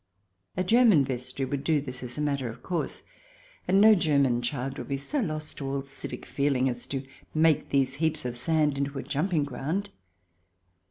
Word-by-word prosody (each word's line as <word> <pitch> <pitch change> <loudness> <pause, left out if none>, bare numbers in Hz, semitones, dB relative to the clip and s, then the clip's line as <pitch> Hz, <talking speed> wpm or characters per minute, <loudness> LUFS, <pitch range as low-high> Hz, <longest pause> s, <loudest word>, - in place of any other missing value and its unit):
A 185 - +2
German 220 - +5
vestry 130 +1 -3
would 140 0 -3
do 155 0 +2
this 130 -2 -6
as 125 -1 -6
a - - -1
matter 140 -4 -1
of 115 - -10
course. 175 -3 -2 0.6
And 190 +2 +4
no 215 +1 +8
German 140 - +3
child 135 +2 -3
would - - -6
be 140 - -1
so 285 - -2
lost 155 - -3
to 140 - -4
all 135 0 -2
civic 135 0 -7
feeling 140 -2 +1
as 120 -1 -3
to 135 -1 -4 0.3
make 155 -1 +3
these 135 -1 +2
heaps 160 -4 0
of 125 -1 -2
sand 150 +1 +1
into 140 0 -2
a - - -3
jumping 155 +2 0
ground. 150 +9 -3
140 Hz, 185 wpm, -28 LUFS, 135-160 Hz, 0.6 s, no